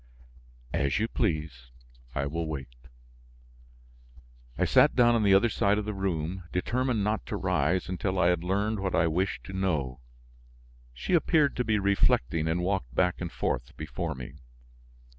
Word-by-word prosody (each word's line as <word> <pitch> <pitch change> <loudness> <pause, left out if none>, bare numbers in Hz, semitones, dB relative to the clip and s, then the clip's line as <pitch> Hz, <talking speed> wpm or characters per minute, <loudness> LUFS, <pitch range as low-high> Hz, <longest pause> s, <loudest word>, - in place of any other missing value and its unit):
"As 70 -1 +1
you 110 - +1
please; 75 - -2 0.5
I 70 - 0
will 80 +3 -3
wait." 70 -6 -6 1.8
I - - +2
sat - - +5
down 120 -1 +5
on 115 - +2
the 100 -2 +5
other 100 +5 +5
side 105 -2 +1
of 105 - -2
the 105 - -3
room 90 -2 -3
determined 120 +4 0
not 105 -1 0
to - - -3
rise 85 +6 0
until 95 +1 -2
I 90 -1 +4
had 90 -1 0
learned 100 +4 0
what 95 -1 -1
I 80 - +3
wished 90 +4 -1
to 95 - -9
know. 75 -10 -1 0.9
She - - -4
appeared 155 -4 +3
to 125 - +1
be 110 -2 +1
reflecting 85 -6 +2
and 85 +2 0
walked 90 -10 -2
back 90 0 +1
and 85 - -4
forth - - -3
before 80 +2 -4
me. 65 +3 -9
90 Hz, 160 wpm, -28 LUFS, 75-100 Hz, 1.8 s, sat